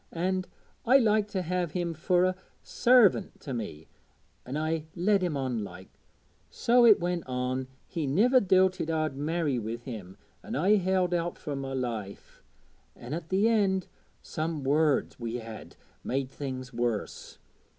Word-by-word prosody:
An' 185 +2 -1 0.4
I 255 +3 +6
liked 215 -4 +2
to 190 -2 -1
have 175 -2 -2
him 175 -2 -1
fur 180 +2 +2
a 185 0 +1 0.3
sarvint 240 -5 +3
to 135 - -6
me, 90 -10 -6 0.6
an' 135 +4 -3
I 155 0 -1
led 195 +3 +2
him 175 -6 -1
on 125 -5 -2
like. 95 -1 -10 0.6
So 240 0 +4
it 215 - +7
went 175 0 -1
on 130 0 -2 0.2
he 160 -5 -3
niver 230 - +4
doubted 185 -4 +2
I'd 155 -3 -1
marry 150 -2 -1
wi' 110 +1 -4
him, 110 -6 -9 0.2
an' - - -6
I 195 +8 +4
held 185 -1 +1
out 175 0 -1
fur 145 - -5
my 135 -1 -4
life. 115 -6 -5 0.5
Then 120 +4 -8
at 165 0 -5
th' 195 +3 +2
end, 200 -5 +2 0.4
some 155 -2 -3
words 145 0 +1
we 115 -1 -4
had 115 -2 -8 0.3
made 135 0 -2
things 130 -2 -6
worse. 120 -3 -3
160 Hz, 155 wpm, -28 LUFS, 130-185 Hz, 0.6 s, it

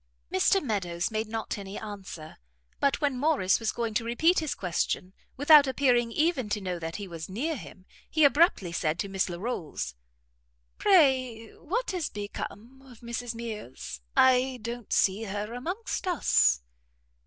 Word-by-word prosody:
Mr 390 - +4
Meadows 185 -6 -1
made 220 0 -2
not 220 -1 -4
any 195 +1 -7
answer; 195 -7 -8 0.4
but 280 +2 +1
when 280 -4 0
Morrice 275 -11 +2
was 225 -2 0
going 230 -2 -3
to 220 - 0
repeat 315 +10 +3
his 310 -3 -2
question, 180 +1 -2 0.2
without 290 +1 +7
appearing 250 -3 +2
even 300 -4 +1
to 210 +1 0
know 180 -3 -4
that 165 0 -5
he 205 -2 -5
was 165 -1 -7
near 285 - -2
him, 190 -6 -11 0.2
he 315 - +2
abruptly 285 - +4
said 165 -2 -1
to 200 - -2
Miss 195 -1 -1
Larolles, 170 - -4 0.9
"Pray 260 - +3
what 425 +7 -3
is 350 -5 -2
become 210 +4 -7
of 250 -4 -16
Mrs 235 0 -4
Mears? 210 - -7 0.2
I 260 0 +4
don't 235 -1 -6
see 200 +3 +2
her 205 +2 -4
amongst 360 - -4
us." 65 - +3
230 Hz, 155 wpm, -28 LUFS, 195-270 Hz, 0.9 s, without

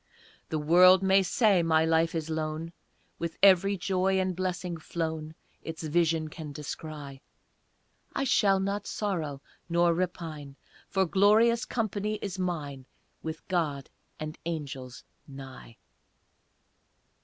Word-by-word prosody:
The 155 - -1
world 180 +5 +6
may 190 +1 +5
say 200 -1 +3
my 160 -1 +3
life 165 +1 +2
is 160 -1 -2
lone, 160 +1 -3 0.5
With 170 -1 -4
every 195 +1 +6
joy 190 +1 +1
and 185 -1 -1
blessing 180 -1 -3
flown 160 -1 -4 0.3
Its 160 0 -7
vision 160 0 +1
can 155 -1 -8
descry; 145 -1 -7 0.9
I 275 - 0
shall 200 -7 +3
not 200 +1 -2
sorrow 160 -9 -3 0.3
nor 170 0 +3
repine, 165 -5 -4 0.3
For 190 -1 +1
glorious 215 +6 +4
company 215 -2 -2
is 195 -3 -5
mine 145 -7 -3 0.3
With 160 0 -7
God 155 -7 -1 0.3
and 155 +1 -6
angels 140 -6 -5 0.2
nigh. 135 -4 -11
165 Hz, 120 wpm, -28 LUFS, 155-190 Hz, 0.9 s, world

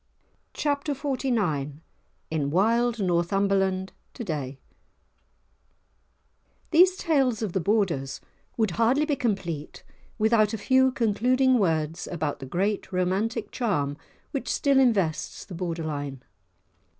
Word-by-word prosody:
*Chapter 290 0 -1
XLIX* 235 - -1 0.6
*In 150 -3 0
Wild 230 +8 +2
Northumberland 190 +1 +1 0.2
To 240 - -5
day* 140 - -4 2.1
These 365 +3 +6
tales 270 - +1
of 200 -5 -3
the 190 - +1
Borders 170 -9 0 0.4
would 220 -4 +1
hardly 235 - +2
be 300 -2 0
complete 175 - -3 0.3
without 220 0 +3
a - - -4
few 260 +4 +3
concluding 250 +3 +2
words 160 -3 0
about 155 -4 -3
the 135 - -7
great 195 +8 -1
romantic 200 +5 -1
charm 145 - -1 0.4
which 275 - -3
still 275 -1 +3
invests 200 -11 +1
the 190 - -10
Borderline. 155 -6 -4
200 Hz, 110 wpm, -26 LUFS, 165-245 Hz, 2.1 s, These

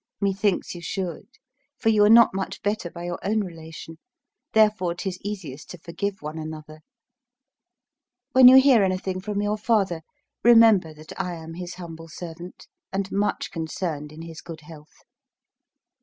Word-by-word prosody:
Methinks 200 -1 0
you 175 - -9
should; 185 +1 -4 0.5
for 225 - +1
you 215 -2 +4
are 205 - +5
not 230 -1 +7
much 190 0 -5
better 205 -3 -1
by 170 +1 -9
your 175 0 -4
own 215 +2 +1
relation; 165 -3 -9 0.5
therefore 210 -5 +3
'tis 185 0 -5
easiest 185 -9 -7
to 180 - -8
forgive 190 +3 -5
one 155 +2 -5
another. 155 0 -8 1.5
When 260 -1 +8
you 260 +1 +10
hear 265 -4 +5
anything 185 0 -2
from 205 +1 -2
your 210 +1 -1
father, 200 -7 +1 0.4
remember 225 -8 +6
that 155 0 -12
I 180 -2 -4
am 165 0 -9
his 180 +1 -7
humble 165 -2 -9
servant, 170 +1 -9 0.3
and 195 0 -3
much 205 +1 -1
concerned 160 -2 -4
in 155 +2 -10
his 165 -1 -9
good 165 -2 -10
health. 150 0 -15
180 Hz, 155 wpm, -24 LUFS, 165-205 Hz, 1.5 s, you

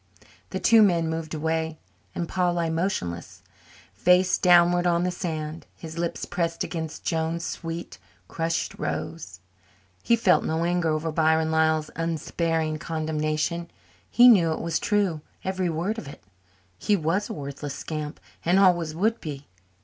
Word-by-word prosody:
The - - -3
two 225 -1 +6
moved 165 -4 +1
away 160 +1 -1 0.4
then, - - -1
and - - -5
Paul 180 -1 0
lay 165 -1 0
motionless, 160 - -3 0.5
face 180 - +3
downward 175 0 +5
on 170 0 +2
the 180 - 0
sand, 160 -3 -5
his 160 0 -8
lips 170 -1 -2
pressed 170 -1 -2
against 160 -3 -5
Joan's 165 +1 -1
sweet, 165 0 -6 0.3
crushed 165 0 -2
rose. 95 - -5 0.6
He 235 - +3
felt 220 -6 +3
no 160 +1 -1
anger 175 -1 +1
over 155 +1 -1
Byron 160 0 +2
Lyall's 160 -1 +2
unsparing 165 -1 -1
condemnation. 155 +1 -2 0.4
He 245 +1 +7
knew 180 -9 +6
it - - -5
was 165 -1 -1
true, 195 -7 0 0.2
every 190 -1 -1
word 175 +8 -2
of 150 - -9
it. 140 - -11 0.6
He 205 - +2
was 180 +4 -1
a - - -3
worthless 140 0 -6
scamp 155 -1 -5 0.2
and 175 +3 +3
always 175 -5 +3
would 220 +6 0
be. 145 -2 -6
165 Hz, 150 wpm, -25 LUFS, 155-175 Hz, 0.6 s, He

